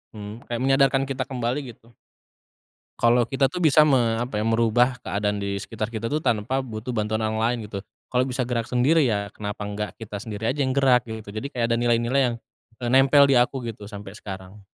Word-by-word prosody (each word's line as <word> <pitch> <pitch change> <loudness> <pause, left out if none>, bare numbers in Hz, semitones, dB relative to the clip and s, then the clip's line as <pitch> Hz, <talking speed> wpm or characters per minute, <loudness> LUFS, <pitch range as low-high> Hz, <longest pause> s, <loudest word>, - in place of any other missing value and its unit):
mmm, 105 +2 -8
kayak 120 -1 -2
menyadarkan 135 0 +3
kita 135 -1 -2
kembali 130 +1 -3
gitu. 115 0 -24 1.0
Kalau 120 +1 +4
kita 135 +1 +2
tuh 180 +7 -4
bisa 155 -1 +6
me 120 -6 +3
apa 120 -3 -2
ya, - - -2
merubah 115 +2 +2
keadaan 105 -2 -2
di 100 0 -2
sekitar 110 +2 -5
kita 115 0 -3
tuh 150 - +1
tanpa 115 +2 0
butuh 110 0 -6
bantuan 110 -1 -1
yang 110 0 -1
lain 115 -1 -1
gitu. 100 - -5 0.3
Kalau 125 0 +2
bisa 130 0 -1
gerak 120 -2 -2
sendiri, 130 +5 +3
ya 100 -3 -1
kenapa 105 0 -6
enggak 105 0 -4
kita 105 -2 -7
sendiri 110 0 -3
aja 140 +2 0
yang 130 0 0
gerak 130 -3 +4
gitu. 110 -2 -7
Jadi 110 +6 -5
kayak 120 -2 -1
ada 115 - +3
nilai-nilai 120 +2 +2
yang, - - -4 0.5
eee, 120 - -1
nempel 135 +2 +6
di 130 - +5
aku 125 +2 +1
gitu 105 -2 -8
sampai 100 -1 -9
sekarang. 95 0 -9
115 Hz, 205 wpm, -24 LUFS, 105-130 Hz, 1.0 s, bisa